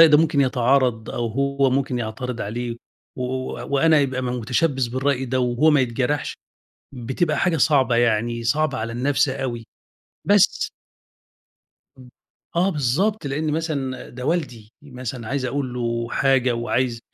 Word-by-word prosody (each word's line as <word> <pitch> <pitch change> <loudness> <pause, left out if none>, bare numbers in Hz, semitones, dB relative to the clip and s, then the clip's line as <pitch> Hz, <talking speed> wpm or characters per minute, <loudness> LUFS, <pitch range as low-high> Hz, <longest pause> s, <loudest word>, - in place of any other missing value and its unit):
ده 155 -2 +9
ممكن 150 -3 +2
يتعارض 125 -3 +2
أو 120 -1 -2
هو 140 +3 +1
ممكن 130 -1 0
يعترض 120 +2 -4
عليه 115 +3 -4 0.4
و 125 - -3
و 130 +1 -4
وأنا 155 +3 +4
يبقى 130 -2 -1
م - - -2
متشبث 125 +3 0
بالرأي 130 +2 -1
ده 130 +1 -1
وهو 125 +5 +3
ما 145 -2 +4
يتجرحش، 130 +4 -1 0.6
بتبقى 130 +6 -1
حاجة 175 -2 +2
صعبة 130 -5 +3
يعني 115 0 +1
صعبة 145 +2 +1
على 115 +1 -3
النَفس 140 +4 +1
أوي. 130 -4 -4 0.6
بس 205 -1 +3 1.3
امم، 125 -1 -14 0.5
آه 185 +3 +3
بالضبط، 155 - 0
لأن 150 +3 -1
مثلًا 145 -5 -3
ده 125 +1 -8
والدي. 125 -10 -2
مثلًا 125 -4 -7
عايز 135 0 -2
أقول 130 -1 -2
له 115 -1 -2
حاجة 130 -2 +2
وعايز 120 0 -1
130 Hz, 145 wpm, -22 LUFS, 120-145 Hz, 1.3 s, ده